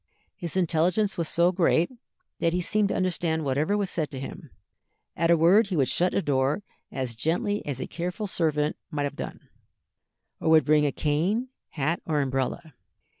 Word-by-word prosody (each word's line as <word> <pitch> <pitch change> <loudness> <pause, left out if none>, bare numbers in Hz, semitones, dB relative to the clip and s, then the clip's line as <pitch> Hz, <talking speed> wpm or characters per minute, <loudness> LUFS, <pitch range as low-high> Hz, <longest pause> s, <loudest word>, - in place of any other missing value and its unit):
His 175 0 -3
intelligence 180 +4 +1
was 165 -2 -2
so 170 +1 +3
great 175 0 +2 0.5
that 165 0 +1
he 180 - +1
seemed 210 +3 +1
to - - -1
understand 170 -4 0
whatever 150 +9 +1
was 200 -2 -1
said 155 -3 -1
to 135 - -7
him; 135 +2 -8 0.7
at 165 0 +1
a 170 - +6
word 190 +7 +5
he 190 - -2
would 135 -5 +2
shut 180 +1 +1
a 195 - +1
door 140 +6 +1 0.3
as 130 -3 -3
gently 175 - -1
as 135 -3 -3
a - - -3
careful 180 +5 -4
servant 155 -5 0
might 150 -4 -2
have 145 - -3
done, - - -6 1.0
or - - 0
would 160 -1 +6
bring 150 -1 +4
a - - 0
cane, 175 - 0 0.2
hat, 155 +3 -1
or 150 -2 +1
umbrella. 135 +3 -2
165 Hz, 180 wpm, -26 LUFS, 150-180 Hz, 1.0 s, a